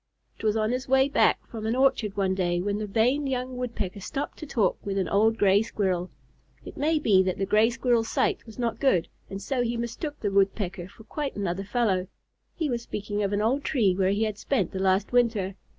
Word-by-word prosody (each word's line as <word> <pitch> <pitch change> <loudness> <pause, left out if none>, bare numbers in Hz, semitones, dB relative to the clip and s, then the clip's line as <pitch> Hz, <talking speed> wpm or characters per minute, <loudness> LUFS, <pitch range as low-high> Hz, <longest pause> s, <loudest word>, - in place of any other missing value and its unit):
It - - -11
was 215 0 +2
on 215 +1 +1
his 255 +1 -2
way 265 +1 +4
back - - +2
from 220 -2 -5
an 225 - 0
orchard 255 -6 +2
one 190 -1 +1
day, 175 -2 0
that 200 +3 -1
the 215 - -3
vain 250 +8 +1
young 255 -1 -3
Woodpecker 230 -6 -4
stopped 275 +8 -5
to 310 - -7
talk 215 -9 0
with 195 -1 -3
an 190 - 0
old 220 +3 +3
Gray 200 -1 +4
Squirrel. 185 -5 -1 0.6
It - - -9
may 315 +2 +1
be 210 -10 +4
that 185 -1 -1
the 195 - 0
Gray 215 +3 +4
Squirrel's 235 -2 +1
sight 415 -2 0
was 220 - -12
not 235 -2 -2
good, 185 -12 +2 0.2
and 195 0 -5
so 255 +4 -1
he 240 0 -1
mistook 265 +6 -4
the 205 - -1
Woodpecker 195 -2 0
for 210 +3 -16
quite 285 +4 -4
another 195 -1 -2
fellow. 200 -4 0 0.5
He 320 - -1
was 240 -4 -2
speaking 205 -2 -4
of 200 -1 0
an 205 +1 0
old 265 +6 +1
tree 215 -10 +2
where 190 0 +1
he 205 +3 +1
had 215 -2 -2
spent 220 -10 0
the 190 - -4
last 190 +1 +1
winter. 225 -6 +2
215 Hz, 225 wpm, -26 LUFS, 195-250 Hz, 0.6 s, way